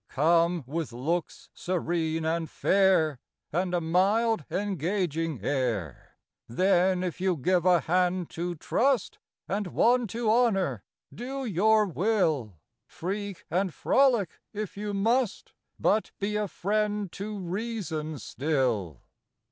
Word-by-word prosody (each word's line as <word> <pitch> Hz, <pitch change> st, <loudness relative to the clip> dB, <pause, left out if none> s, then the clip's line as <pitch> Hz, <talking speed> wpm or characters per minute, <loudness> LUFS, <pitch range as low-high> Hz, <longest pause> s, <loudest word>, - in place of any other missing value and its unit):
Come, 170 Hz, +2 st, +2 dB
with 155 Hz, +2 st, -3 dB
looks 155 Hz, +8 st, -3 dB
serene 165 Hz, -3 st, -1 dB
and 160 Hz, 0 st, -1 dB
fair, 180 Hz, -8 st, +3 dB, 0.3 s
And 180 Hz, +2 st, 0 dB
a -, -, +2 dB
mild 195 Hz, +4 st, +2 dB
engaging 170 Hz, -, -1 dB
air: 115 Hz, -, -2 dB, 0.3 s
Then, 185 Hz, +6 st, +2 dB
if 180 Hz, 0 st, -4 dB
you 185 Hz, -3 st, +1 dB
give 180 Hz, +5 st, +1 dB
a 175 Hz, -3 st, +5 dB
hand 180 Hz, +2 st, 0 dB
to 175 Hz, +1 st, -3 dB
Trust, 250 Hz, -, 0 dB, 0.3 s
And 200 Hz, +1 st, -2 dB
one 240 Hz, +5 st, +3 dB
to 230 Hz, +3 st, -3 dB
Honor, 195 Hz, -, +2 dB, 0.3 s
do 265 Hz, +3 st, -5 dB
your 215 Hz, +1 st, +3 dB
will; 165 Hz, -, 0 dB, 0.3 s
Freak 200 Hz, +2 st, -5 dB
and 185 Hz, +2 st, +1 dB
frolic 245 Hz, -, +2 dB
if 210 Hz, -2 st, -5 dB
you 205 Hz, 0 st, -4 dB
must, 225 Hz, +2 st, 0 dB, 0.3 s
But 215 Hz, -, +2 dB
be 205 Hz, +1 st, -1 dB
a 210 Hz, 0 st, 0 dB
friend 210 Hz, 0 st, -1 dB
to 205 Hz, +3 st, -5 dB
Reason 180 Hz, -5 st, -4 dB
still. 125 Hz, -, -1 dB
180 Hz, 120 wpm, -28 LUFS, 160-210 Hz, 0.3 s, a